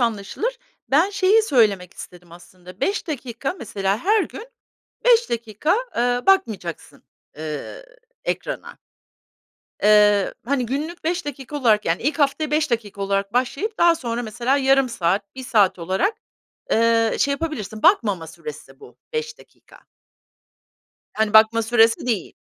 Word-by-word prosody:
anlaşılır. 235 - -2 0.3
Ben 325 +9 +4
şeyi 410 +2 +3
söylemek 210 - +2
istedim 175 -1 -12
aslında, 180 +2 -15
5 400 -1 -1
dakika 265 -1 -4
mesela, 195 -2 -2
her 420 - +2
gün 450 - -8 0.6
5 475 -1 +4
dakika, 230 - -1 0.2
eee, 245 +1 +1
bakmayacaksın, 220 - 0 0.3
eee, 155 - -6 0.4
ekrana. - - -4 1.1
Eee, 210 -1 +4
hani, 255 -1 -1
günlük 310 +7 -4
5 350 +1 -1
dakika 285 0 -6
olarak, 220 -6 +2
yani, 165 +5 -1
ilk 300 +4 -1
haftaya 290 +2 +1
5 305 -1 +1
dakika 205 -4 -3
olarak 195 0 -1
başlayıp 275 - -1
daha 340 -1 +5
sonra 240 -5 -4
mesela 240 +5 0
yarım 270 -1 +3
saat, 200 -1 -1
1 260 - -8
saat 205 -7 +2
olarak, 190 - 0 0.6
eee, 230 0 +3
şey 280 - +2
yapabilirsin. 275 - -5
Bakmama 210 - +3
süresi 445 - -10
bu 420 - -15 0.2
5 465 0 -4
dakika. - - -20 1.4
Yani, 220 -1 +1
bakma 220 +1 +6
süresi 225 +1 +3
değil. 220 -7 -2
240 Hz, 135 wpm, -22 LUFS, 205-310 Hz, 1.4 s, bakma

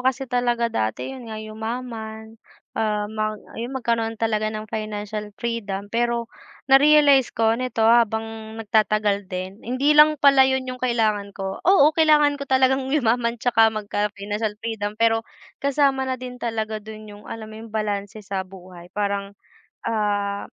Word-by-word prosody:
kasi 260 +1 0
talaga 240 -2 0
dati 110 - -2
yun 250 -4 -9
nga 220 - -6
yumaman, 220 0 -6 0.3
ah, 210 -1 -1
mang 215 0 -3 0.2
yung 245 +3 -4
magkaroon 230 -2 -1
talaga 215 -1 0
ng 215 0 -5
financial 210 -1 -4
freedom 205 -4 -4
pero 235 0 0 0.4
na-realize 280 -1 +6
ko 225 0 +3
nito 235 -1 -1
habang 225 -1 +1
nagtatagal 215 -2 +1
din, 185 +2 -6
hindi 255 +5 +1
lang 300 +1 +6
pala 275 -2 +6
yun 265 0 0
yung 255 -1 -6
kailangan 215 -5 0
ko. 195 -1 -4
Oo, 315 -6 +6
kailangan 300 -2 +4
ko 280 - -6
talagang 265 0 +2
yumaman 240 -4 +1
tsaka 225 -1 +4
magka-financial 210 0 -3
freedom 215 -2 -3
pero 225 0 +3 0.4
kasama 275 -1 +1
na 260 - -1
din 250 -1 -9
talaga 220 -2 -3
dun 215 0 -10
yung 205 0 -13
alam 225 -1 -6
mo 215 - -9
yung 225 - -10
balanse 210 0 -3
sa 195 -1 -3
buhay 185 -2 -11
parang, 200 -1 -2 0.5
ah, 205 -2 -1
225 Hz, 150 wpm, -23 LUFS, 210-255 Hz, 0.5 s, na-realize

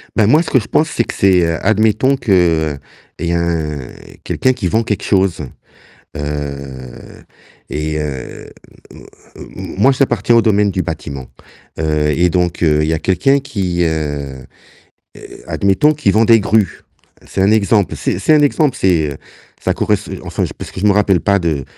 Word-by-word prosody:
Bah 110 - +3
moi 150 +10 +4
ce 170 - -4
que 130 - +3
je 105 - -8
pense, 155 0 +1
c'est 120 - 0
que - - -7
c'est 95 -3 +3
admettons 110 - +2
qu'il 85 - +1 0.4
y 85 0 -1
a 85 -3 -1 0.5
quelqu'un 130 0 +1
qui 115 -7 -3
vend 110 +6 +1
quelque 105 -3 -3
chose, 95 -5 +1 0.7
heu, 70 -4 -7 0.5
et 75 0 -3
heu, 70 -4 -6 0.4
m - - -14 0.3
m - - -10 0.3
moi 130 +7 +4
j'appartiens 120 -3 +1
au 115 - +6
domaine 105 -2 +2
du 95 -1 -2
bâtiment. 70 -5 -6 0.5
Heu 75 -1 0
et 90 +3 +2
donc 90 -1 -1
heu, 75 -2 +3
il - - -1
y 80 - +1
a 80 - -1
quelqu'un 115 - +2
qui, 95 -10 -2
heu 75 -5 -3 0.7
heu, - - -13
admettons 100 +11 +2
qui 150 -9 -1
vend 110 +3 +3
des 115 -1 +6
grues, 105 0 0 0.5
c'est 95 - -2
un 100 - +4
exemple, 105 -2 +2
c'est - - -2
c'est 155 - +3
un 150 - +5
exemple, 145 -1 +2
c'est 80 -6 +1 0.5
ça - - +1
corres - - -2 0.3
enfin - - -2
parce - - -8
que - - -8
je 105 - +2
me 100 - +5
rappelle 100 -3 +2
pas 100 0 +2
de 80 -6 -1
95 Hz, 175 wpm, -16 LUFS, 75-110 Hz, 0.7 s, au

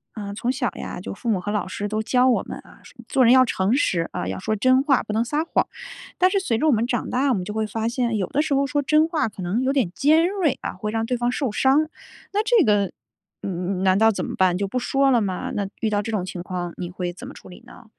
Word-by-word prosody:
呃， 200 -2 -5
从 240 +3 -1
小 260 -1 -1
呀 - - -6
就 - - -6
父 215 - -9
母 205 -4 +2
和 205 - -3
老 210 -2 -1
师 205 +2 -4
都 215 +1 -2
教 250 +3 +3
我 245 - +2
们 - - -8
啊， - - -17
说 - - -16
做 265 -3 +3
人 235 - +6
要 260 0 +7
诚 200 -1 0
实， 170 - +1
啊， 180 - -4
要 - - -3
说 215 +3 -1
真 255 +5 +3
话 275 -3 +3
不 215 - -6
能 225 +2 +1
撒 300 +6 -1
谎。 - - 0 0.5
但 370 - +5
是 395 - +1
随 240 -12 -1
着 315 - +2
我 - - +5
们 230 -2 +2
长 240 0 -2
大， 265 +3 +1
我 - - +3
们 190 -5 -2
就 200 - -6
会 220 0 -1
发 220 +1 -3
现 240 -1 -1
有 190 - -1
的 290 - 0
时 300 -2 -1
候 275 +1 +2
说 290 +1 0
真 305 +3 +3
话 325 -7 0
可 210 -3 -9
能 190 +8 -1
有 265 +1 +1
点 250 -11 +1
尖 315 +4 +4
锐 370 -8 0
啊， - - -4
会 210 -1 -4
让 225 0 -1
对 250 +1 -1
方 240 0 0
受 255 -1 -1
伤。 275 +7 +3 0.4
那 410 - +1
这 460 -4 +4
个 205 -5 +2 0.5
嗯， 185 0 -3
难 190 0 +4
道 220 +2 +5
怎 205 - -3
么 - - -5
办 185 -2 +3
就 200 +1 -1
不 225 - -3
说 270 +2 +2
了 245 -3 +4
吗？ 190 -4 -3
那 200 -1 -1
遇 220 - +1
到 205 -1 +1
这 225 - -4
种 210 -4 -1
情 180 -1 -6
况 180 -2 -4
你 175 -1 -5
会 175 -1 -4
怎 175 - -10
么 - - -9
处 - - -14
理 180 - -13
呢？ 245 - -15
230 Hz, 305 characters per minute, -23 LUFS, 200-270 Hz, 0.5 s, 要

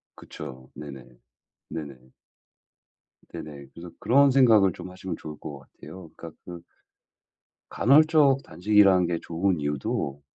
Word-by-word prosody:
그쵸. 65 0 -11
네네. 70 -3 -10 0.7
네네. 70 -5 -9 1.2
네네. 70 -2 -9
그래서 85 0 -11
그런 140 +2 +4
생각을 110 -8 +5
좀 95 - -10
하시면 90 0 -7
좋을 75 -1 -9
것 70 -2 -8
같아요. 85 +5 -13
그러니까 85 -1 -10
그 85 -1 -9 1.1
간헐적 145 0 +4
단식이라는 95 -2 +3
게 85 -1 -2
좋은 85 0 -1
이유도 70 -1 -3
85 Hz, 260 characters per minute, -25 LUFS, 75-105 Hz, 1.2 s, 생각을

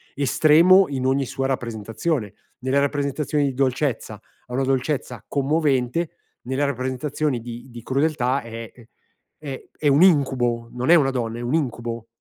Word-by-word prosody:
estremo 160 +7 +5
in 130 -2 -3
ogni 135 +1 +2
sua 135 +1 -2
rappresentazione, 115 - -2 0.3
nella 130 +2 +1
rappresentazione 145 +1 0
di 135 - -1
dolcezza, 130 -4 -1
ha 125 +3 -17
una 135 - +1
dolcezza 130 -3 -1
commovente, 145 +1 +1 0.3
nella 130 +3 -1
rappresentazione 130 +1 -2
di 120 +2 -8
di 120 -1 -10
crudeltà 140 -1 0
è 115 -1 -8
ehm, 120 - -17 0.5
è 140 -4 -8
è 150 - 0
un 140 +2 +5
incubo, 130 -9 +3
non 125 +4 -3
è 175 - +9
una 140 -5 +3
donna, 115 -3 -3
è - - -6
un 120 +4 -2
incubo. 120 -6 -2
135 Hz, 150 wpm, -23 LUFS, 120-145 Hz, 0.5 s, è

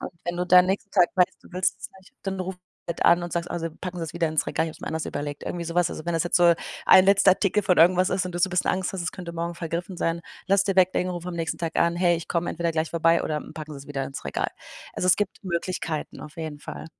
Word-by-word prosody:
Und - - -5
wenn 175 0 -3
du 180 - -1
dann 180 0 +7
nächsten 195 +2 -2
Tag 175 - +4
weißt, 180 -1 +2
du - - -16
willst 185 +1 0
es - - -7
nicht, 190 - -21
dann 195 -1 -3
ruf 185 0 -4 0.3
halt 170 - -2
an 175 +1 +5
und 175 - -5
sagst: 170 0 -2
„Oh, - - -2
Sie 165 0 -3
packen 180 +3 -7
Sie 165 - -2
es 160 - -8
wieder 170 -2 +1
ins 155 0 0
Regal, 160 - 0
ich - - -4
hab's - - -15
mir - - -8
anders 160 0 -2
überlegt.“ 145 0 -5
Irgendwie 170 -1 -4
so 170 - -5
was. 175 -1 +2
Also, 155 - -7
wenn 170 - 0
das 165 - +2
jetzt 175 - +2
so 170 -1 +6 0.3
1 185 - +8
letzter 200 -1 +6
Artikel 200 +2 +1
von 185 -2 +2
irgendwas 180 +2 +5
ist 185 +1 0
und 180 - -6
du - - -2
so 190 - +4
'n - - -12
bisschen 180 -1 +1
Angst 185 0 -1
hast, 185 - -3
es 170 - -3
könnte 175 -3 -7
morgen 170 +1 -3
vergriffen 170 +2 -4
sein, 165 0 0 0.3
lass 195 +1 +4
es - - -9
dir 195 -2 -1
weglegen, 185 0 +3
ruf 175 0 -6
am 180 - -4
nächsten 165 -1 -2
Tag 165 -1 -3
an: 170 0 +3
„Hey, 175 -1 +3
ich 165 - -7
komme 170 0 -1
entweder 170 0 -1
gleich 160 0 -1
vorbei 165 0 +3
oder, 155 - -1
hm, - - -10
packen 155 -1 -7
Sie's 140 - -12
wieder 140 -2 -3
ins 135 - -8
Regal." - - -1 0.5
Also, 185 - -1
es 180 - +6
gibt 205 0 -3
Möglichkeiten, 170 -3 -3
auf 150 - -11
jeden 155 -3 -6
Fall. - - -8
175 Hz, 300 wpm, -25 LUFS, 165-185 Hz, 0.5 s, 1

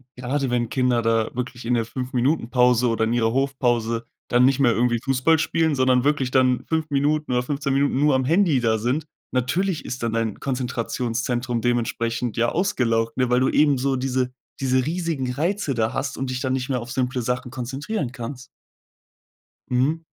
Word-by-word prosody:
Gerade 130 +2 -2
wenn 120 -2 0
Kinder 125 -2 +1
da 115 -1 +1
wirklich 125 -1 -5
in 120 - +1
der 115 -1 +2
5 125 +2 -6
Minuten 125 0 +1
Pause 125 -1 +3
oder 115 -1 +1
in 110 +1 +1
ihrer 115 -1 +1
Hofpause 120 -4 0 0.2
dann 125 +1 +4
nicht 135 +1 +3
mehr 130 -4 +4
irgendwie 120 0 +1
Fußball 135 +4 +3
spielen, 160 -1 +1
sondern 130 -1 +3
wirklich 145 -3 +1
dann 130 -1 +3
5 160 -1 0
Minuten 145 +1 0
oder 125 0 +1
15 140 +1 -2
Minuten 140 -1 +1
nur 145 -1 +4
am 130 - +1
Handy 165 -2 +3
da 110 -2 +2
sind, 125 +8 -1 0.3
natürlich 165 +8 0
ist 125 -1 -5
dann 115 -1 -1
dein 115 -2 -1
Konzentrationszentrum 125 -1 -2
dementsprechend, 120 -1 -1
ja, 120 +1 +2
ausgelaugt, 120 - 0
ne? 130 -1 +1
Weil 125 +1 +3
du 130 - +3
eben 145 -2 +3
so 135 +1 0
diese 130 -1 -1 0.3
diese 130 -1 +1
riesigen 160 -5 -2
Reize 170 +2 -1
da 110 -1 0
hast 140 - -3
und 135 -1 -3
dich 125 - -3
dann 130 -2 0
nicht 130 0 -2
mehr 130 -2 0
auf 120 +1 -8
simple 125 0 -1
Sachen 125 +1 -3
konzentrieren 135 - -4
kannst. 125 +1 -7 1.2
Mhm. 130 +6 +1
125 Hz, 190 wpm, -23 LUFS, 120-140 Hz, 1.2 s, dann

